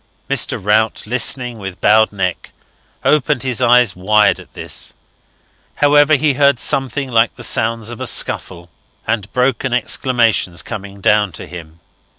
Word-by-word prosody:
Mr. - - 0
Rout, 110 +3 0
listening 125 0 0
with 95 -2 -8
bowed 110 +1 +4
neck, 95 -3 -3 0.6
opened 150 -3 +1
his 130 -2 -2
eyes 125 -3 +4
wide 105 +3 +2
at - - -16
this. - - -6 0.8
However, 145 +1 +4
he 145 +1 +1
heard 140 -1 +3
something 135 0 -1
like 115 0 +2
the - - -11
sounds 115 0 -1
of 120 - -9
a - - -3
scuffle 85 -2 -2 0.3
and 110 -3 -3
broken 125 0 0
exclamations 115 -9 0
coming 100 -1 -8
down 105 0 +2
to - - -8
him. 85 -2 -12
115 Hz, 145 wpm, -16 LUFS, 100-130 Hz, 0.8 s, bowed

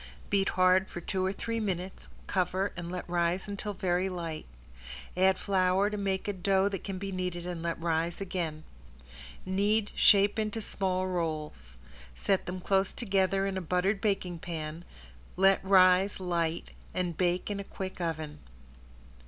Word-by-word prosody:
Beat 195 -1 +3
hard 185 +1 +4
for - - -6
two 185 +2 -2
or 190 - +1
three 230 +3 -3
minutes, 190 -3 -3 0.2
cover, 190 +1 0
and 175 -1 -5
let 180 - -5
rise 175 +2 0
until 205 +1 -3
very 180 +1 0
light. 165 -4 -5 0.7
Add 190 +1 +4
flour 190 +1 +2
to - - -2
make 195 -1 -1
a 205 - 0
dough 190 +1 +2
that 195 -2 -5
can 195 -2 -4
be 195 +1 -4
kneaded 180 -2 -3
and 175 -2 -4
let 170 0 -2
rise 165 0 0
again. 170 -5 -3 0.8
Knead, 205 +3 +1
shape 205 +1 +5
into 215 +1 -1
small 185 -3 -1
rolls. 155 - -3 0.4
Set 195 - 0
them 185 +1 -4
close 195 +1 +2
together 195 -3 +1
in 195 -1 -2
a - - -2
buttered 185 +4 0
baking 185 -5 -1
pan, 160 0 -5 0.5
let 195 +1 +4
rise 190 0 +5
light, 170 -3 -1 0.2
and 180 -2 -1
bake 180 +3 0
in 200 - -3
a - - -3
quick 190 -1 -6
oven. 155 -3 -3
185 Hz, 160 wpm, -30 LUFS, 175-195 Hz, 0.8 s, shape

